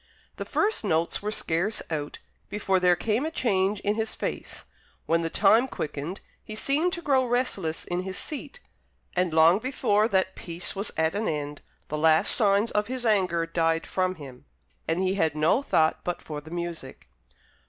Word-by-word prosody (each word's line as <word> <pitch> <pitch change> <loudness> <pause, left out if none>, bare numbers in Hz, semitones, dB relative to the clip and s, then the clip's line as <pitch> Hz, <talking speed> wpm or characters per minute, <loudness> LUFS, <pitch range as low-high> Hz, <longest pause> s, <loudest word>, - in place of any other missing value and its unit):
The - - -4
first 425 - +1
notes 165 -4 0
were 210 - -2
scarce 195 +1 0
out, 150 -2 -3 0.3
before 195 -2 +1
there 180 -1 +4
came 220 - 0
a 315 - -1
change 200 -8 +1
in 205 - +1
his 220 0 -2
face; - - -5 0.4
when 165 +1 +2
the 165 - -2
time 215 +8 +4
quickened, 155 - -5 0.2
he 215 - -8
seemed 295 +10 +2
to 345 -2 -3
grow 270 -3 +3
restless 240 -10 -1
in 175 +1 -2
his 190 0 -5
seat; 315 - -6 0.6
and 180 -1 +1
long 165 +4 +5
before 220 -4 +1
that 190 -3 +1
piece 170 +2 -4
was 200 +2 -3
at 160 +1 +2
an 210 +2 -1
end, 145 -1 -3 0.3
the 150 - -2
last 160 0 +4
signs 205 0 +2
of 210 0 0
his 255 0 -4
anger 185 -6 +2
died 165 -1 0
from 185 0 -1
him, 135 -4 -11 0.4
and 165 +3 0
he 190 0 +1
had 160 -6 +1
no 155 - +3
thought 160 - +2
but 175 - -2
for 150 -2 -7
the 155 - -13
music. 170 -5 -6
185 Hz, 180 wpm, -26 LUFS, 165-215 Hz, 0.6 s, long